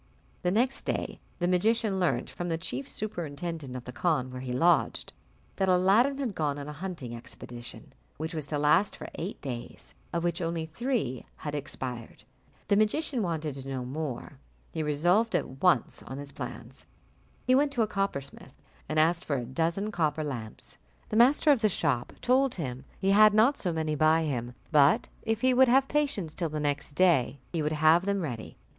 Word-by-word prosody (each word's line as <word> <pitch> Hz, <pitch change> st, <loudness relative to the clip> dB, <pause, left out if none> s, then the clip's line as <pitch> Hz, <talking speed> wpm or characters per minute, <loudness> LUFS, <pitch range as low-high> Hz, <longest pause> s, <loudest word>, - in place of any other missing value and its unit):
The 180 Hz, -, +1 dB
next 245 Hz, +8 st, +1 dB
day -, -, -3 dB, 0.2 s
the 175 Hz, -, 0 dB
magician 205 Hz, +2 st, +2 dB
learnt, 180 Hz, -, +1 dB
from 175 Hz, 0 st, -5 dB
the 165 Hz, -, 0 dB
chief 135 Hz, -4 st, -5 dB
superintendent 165 Hz, -7 st, -5 dB
of 125 Hz, -, -6 dB
the 125 Hz, -, -7 dB
khan 130 Hz, -1 st, 0 dB
where 125 Hz, 0 st, -6 dB
he 130 Hz, -1 st, -5 dB
lodged, 170 Hz, +8 st, +2 dB, 0.4 s
that 190 Hz, -1 st, +1 dB
Aladdin 200 Hz, +10 st, +4 dB
had 260 Hz, -7 st, -2 dB
gone 150 Hz, -4 st, -1 dB
on 140 Hz, 0 st, -6 dB
a 150 Hz, -, -6 dB
hunting 150 Hz, -7 st, -6 dB
expedition, 120 Hz, 0 st, -10 dB, 0.2 s
which 160 Hz, +3 st, -4 dB
was 155 Hz, -3 st, -4 dB
to 150 Hz, -, -2 dB
last 150 Hz, +7 st, +3 dB
for -, -, -8 dB
eight 180 Hz, +6 st, -5 dB
days, 120 Hz, -4 st, -7 dB, 0.2 s
of 170 Hz, 0 st, -1 dB
which 175 Hz, +1 st, 0 dB
only 165 Hz, -1 st, -2 dB
three 170 Hz, -, -2 dB
had 150 Hz, -, -6 dB
expired. 130 Hz, -6 st, -6 dB, 0.4 s
The 200 Hz, -, +3 dB
magician 240 Hz, +4 st, +1 dB
wanted 160 Hz, -5 st, -2 dB
to 135 Hz, 0 st, -7 dB
know 130 Hz, -1 st, -3 dB
no -, -, -7 dB
more, 135 Hz, -1 st, -5 dB, 0.3 s
He 160 Hz, -, -3 dB
resolved 175 Hz, +10 st, +2 dB
at 130 Hz, +1 st, -2 dB
once 175 Hz, -10 st, +2 dB
on 130 Hz, -, -8 dB
his 140 Hz, 0 st, -6 dB
plans. -, -, -8 dB, 0.6 s
He 255 Hz, -, +4 dB
went 280 Hz, +2 st, +4 dB
to 235 Hz, -, +2 dB
a -, -, 0 dB
coppersmith, 170 Hz, -10 st, -4 dB, 0.3 s
and 155 Hz, -, -1 dB
asked 170 Hz, +3 st, +3 dB
for 145 Hz, -, -1 dB
a 120 Hz, -, -3 dB
dozen 165 Hz, -, -1 dB
copper 155 Hz, -4 st, 0 dB
lamps: 120 Hz, -7 st, -7 dB, 0.3 s
the -, -, -3 dB
master 270 Hz, +6 st, +5 dB
of 265 Hz, -5 st, +3 dB
the 215 Hz, -, +4 dB
shop 145 Hz, -10 st, 0 dB
told 260 Hz, +1 st, +3 dB
him 130 Hz, -6 st, -5 dB
he 195 Hz, 0 st, +1 dB
had 210 Hz, +1 st, +7 dB
not 235 Hz, +7 st, +5 dB
so 180 Hz, -, -1 dB
many 160 Hz, -1 st, -1 dB
by 155 Hz, +2 st, +3 dB
him, 125 Hz, -5 st, -3 dB, 0.2 s
but 145 Hz, -1 st, +5 dB
if 225 Hz, 0 st, -1 dB
he 260 Hz, 0 st, +4 dB
would 260 Hz, +1 st, +6 dB
have 265 Hz, +2 st, +4 dB
patience 280 Hz, -, 0 dB
till 170 Hz, -3 st, -2 dB
the 150 Hz, 0 st, -3 dB
next 145 Hz, 0 st, -2 dB
day, 150 Hz, -6 st, +3 dB, 0.2 s
he 165 Hz, -, 0 dB
would 150 Hz, +1 st, 0 dB
have 155 Hz, +3 st, +5 dB
them 200 Hz, -1 st, 0 dB
ready. 120 Hz, -9 st, -5 dB
165 Hz, 190 wpm, -29 LUFS, 140-200 Hz, 0.6 s, had